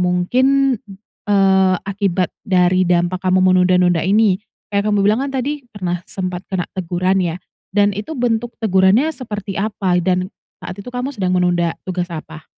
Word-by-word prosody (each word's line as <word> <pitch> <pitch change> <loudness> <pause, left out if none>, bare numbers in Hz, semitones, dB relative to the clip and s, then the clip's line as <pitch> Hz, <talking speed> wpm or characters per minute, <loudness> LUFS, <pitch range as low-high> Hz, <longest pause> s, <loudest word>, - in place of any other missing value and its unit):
mungkin, 255 +10 +2 0.5
eee, 190 -2 +4
akibat 195 -3 -1
dari 185 -1 +3
dampak 175 +1 +1
kamu 185 0 +2 0.2
menunda-nunda 180 -2 +3
ini? 200 +1 +3 0.3
Kayak 200 +1 +1
kamu 205 - +2
bilang 215 +5 +3
kan 280 - -4
tadi 275 +2 -3
pernah 180 -4 -3
sempat 185 -1 -4
kena 185 -2 -2
teguran, 185 +1 0
ya, 170 -1 -2 0.3
dan 205 +1 +2
itu 210 +11 -5
bentuk 240 0 -1
tegurannya 205 +7 +3
seperti 210 -5 -6
apa 195 -4 0
dan 185 0 +1 0.3
saat 180 0 -7
itu 200 - -10
kamu 250 +3 -3
sedang 185 -4 -1
menunda 175 -2 +1
tugas 180 -1 -2
apa? 160 -1 -8
190 Hz, 155 wpm, -18 LUFS, 180-210 Hz, 0.5 s, eee